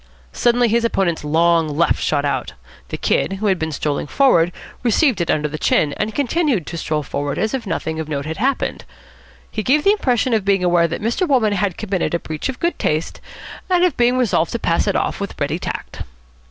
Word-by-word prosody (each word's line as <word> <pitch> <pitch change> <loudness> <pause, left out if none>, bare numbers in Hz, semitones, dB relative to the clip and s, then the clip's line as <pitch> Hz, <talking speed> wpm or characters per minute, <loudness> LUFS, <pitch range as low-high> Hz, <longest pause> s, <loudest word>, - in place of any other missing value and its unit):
Suddenly 240 0 +3
his 230 +1 +1
opponent's 190 -8 0
long 160 0 +2
left 170 -1 +2
shot 145 -1 0
out. 135 -4 -2 0.4
The - - -4
Kid, - - 0
who 195 +3 -4
had 190 -3 +2
been 160 0 -2
strolling 145 0 -2
forward, 175 - +3 0.3
received 245 - +2
it 170 - -2
under 150 -1 +1
the 150 +1 -6
chin, 145 -2 +2
and 215 0 -3
continued 280 - 0
to 170 - -6
stroll 155 -1 -2
forward 140 0 -3
as 220 - -1
if 255 -5 -3
nothing 160 -4 -3
of 155 -1 -5
note 140 -2 -3
had 160 +1 -4
happened. 260 +5 -1 0.7
He 215 - -2
gave 290 +7 +2
the 395 - +5
impression 255 - +1
of 220 -3 +2
being 195 -1 +2
aware 175 -1 +3
that 170 +4 -5
Mr. 235 - 0
Wolmann 240 -8 +2
had 200 -3 -1
committed 190 -5 -1
a - - 0
breach 155 +9 -4
of 260 - -5
good 340 +1 -1
taste 155 +2 -1 0.5
and 360 -1 +3
of 360 - +2
being 245 +1 +2
resolved 215 -9 +1
to - - 0
pass 170 -3 0
it 200 - +1
off - - -1
with 200 -1 -6
ready 145 +4 -1
tact. - - -6
195 Hz, 215 wpm, -19 LUFS, 160-240 Hz, 0.7 s, the